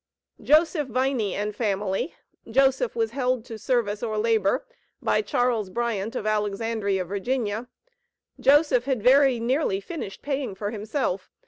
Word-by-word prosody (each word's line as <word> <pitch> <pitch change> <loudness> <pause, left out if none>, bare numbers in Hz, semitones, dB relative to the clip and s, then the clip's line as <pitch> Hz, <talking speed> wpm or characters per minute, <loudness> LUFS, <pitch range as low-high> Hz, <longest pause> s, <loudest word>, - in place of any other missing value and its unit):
Joseph 310 0 +3
Viney 255 -4 0
and 210 +1 -3
family 205 - -1 0.3
Joseph 260 0 +2
was 225 -1 0
"held 250 -2 -1
to 225 -3 -8
service 215 -4 0
or 220 -2 -2
labor," 220 - +1 0.3
by - - +1
Charles 245 - 0
Bryant, 225 -1 -2
of - - -3
Alexandria, 210 -2 -1
Va. 215 +3 -2 0.7
Joseph 280 -4 +4
had 260 -6 -1
very 265 0 +5
nearly 240 -4 0
finished 200 - -7
paying 270 -7 -2
for 205 +1 -3
himself. 215 -3 -2
230 Hz, 130 wpm, -25 LUFS, 205-260 Hz, 0.7 s, very